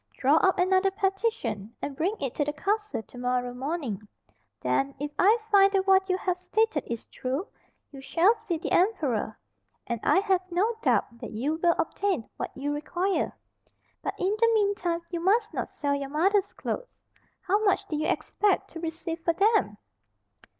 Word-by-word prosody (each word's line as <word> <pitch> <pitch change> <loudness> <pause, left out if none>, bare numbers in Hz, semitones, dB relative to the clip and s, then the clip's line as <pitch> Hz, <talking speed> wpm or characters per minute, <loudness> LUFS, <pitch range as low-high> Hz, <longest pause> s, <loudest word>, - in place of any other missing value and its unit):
Draw 280 +4 +4
up 380 +3 +3
another 375 +1 +3
petition, 385 - -2
and 280 - -5
bring 360 +9 0
it 270 -4 -3
to 295 - 0
the 295 +1 -2
castle 415 - -1
to 245 - -15
morrow 250 0 -1
morning; 265 - -3 0.6
then, 275 0 0
if 290 +1 -3
I 420 +5 +6
find 395 -1 +6
that 385 -1 +2
what 385 0 +4
you 370 - +2
have 365 -1 -1
stated 365 -3 +1
is 235 -1 -5
true, 265 +8 -3 0.5
you 275 -2 -10
shall 345 +9 +4
see 435 -7 -4
the 315 - -5
emperor, 300 - +1 0.5
and 235 -2 -3
I - - +4
have 385 -3 +2
no 380 +7 +1
doubt 235 - +1
that - - -6
you 285 +9 -1
will 340 -1 +4
obtain 365 - -1
what - - -3
you 290 +2 -2
require. 355 +6 -1 0.6
But - - -3
in 390 +3 +1
the 460 0 +5
mean 405 -2 +3
time 345 -4 -2
you 345 - -2
must 425 +5 +2
not - - -3
sell 285 -1 -2
your 280 -1 -3
mother's 380 +7 +2
clothes.—How 425 -4 -4
much 400 -1 +2
did 305 -4 -2
you 310 - 0
expect 410 -3 0
to 330 - -7
receive 330 0 -5
for 335 - +2
them?" 400 - +2
350 Hz, 180 wpm, -27 LUFS, 285-395 Hz, 0.6 s, I